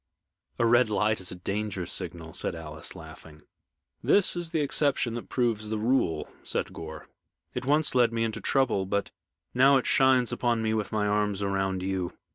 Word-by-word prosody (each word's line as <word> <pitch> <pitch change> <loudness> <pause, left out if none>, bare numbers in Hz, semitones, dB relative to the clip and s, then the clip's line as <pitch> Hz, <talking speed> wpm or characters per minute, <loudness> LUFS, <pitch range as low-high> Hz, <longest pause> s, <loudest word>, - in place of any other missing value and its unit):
"A 120 - +2
red 120 0 +4
light 105 +1 +1
is 90 -1 -2
a - - -6
danger 100 0 -3
signal," 85 -3 -6
said - - -1
Alice, 80 -1 -7
laughing. 75 -2 -12 0.6
"This 200 -3 +3
is 175 -1 -3
the 160 - 0
exception 140 -4 +2
that 120 - -6
proves 115 -4 0
the 110 - -1
rule," 105 -9 0
said - - -1
Gore. 80 -1 -8 0.5
"It - - -4
once 150 +2 +3
led 120 -2 +4
me 115 0 -1
into 110 -1 -3
trouble, 120 -6 +1
but 100 +1 -1 0.4
now 135 +2 +6
it 130 - -1
shines 130 -2 +4
upon 120 -2 0
me 110 0 0
with 110 -2 -2
my 105 -2 0
arms 105 -1 0
around 95 -1 -1
you. 95 -2 -2
110 Hz, 180 wpm, -27 LUFS, 95-125 Hz, 0.6 s, now